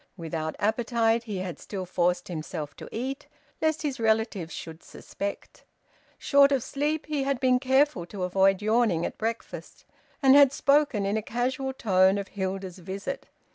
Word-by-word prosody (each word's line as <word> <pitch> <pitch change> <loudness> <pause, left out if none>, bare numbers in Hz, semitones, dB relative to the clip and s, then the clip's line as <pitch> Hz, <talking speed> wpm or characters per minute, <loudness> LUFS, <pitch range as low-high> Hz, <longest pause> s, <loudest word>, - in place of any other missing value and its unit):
Without 160 -2 -4
appetite, 230 +1 +1
he 210 -4 -4
had 185 -2 -5
still 190 -3 -6
forced 180 0 0
himself 155 -3 -5
to - - -10
eat, 265 +4 -4 0.3
lest 315 0 +1
his 280 -4 -2
relatives 220 -6 0
should 160 0 -8
suspect. 200 0 -7 0.5
Short 280 0 +4
of 270 -4 +1
sleep, 295 +2 -2
he 300 -2 -2
had 270 -1 -1
been 255 -1 +3
careful 265 - +2
to 190 0 -6
avoid 190 +2 +2
yawning 215 -6 +2
at - - -6
breakfast, 225 +1 -5 0.4
and 265 -1 +7
had 280 -2 +7
spoken 280 -7 +2
in 200 +2 0
a - - -1
casual 260 +4 -2
tone 190 -6 +3
of 200 -1 -5
Hilda's 190 -1 -4
visit. 195 +9 -6
220 Hz, 160 wpm, -27 LUFS, 185-265 Hz, 0.5 s, and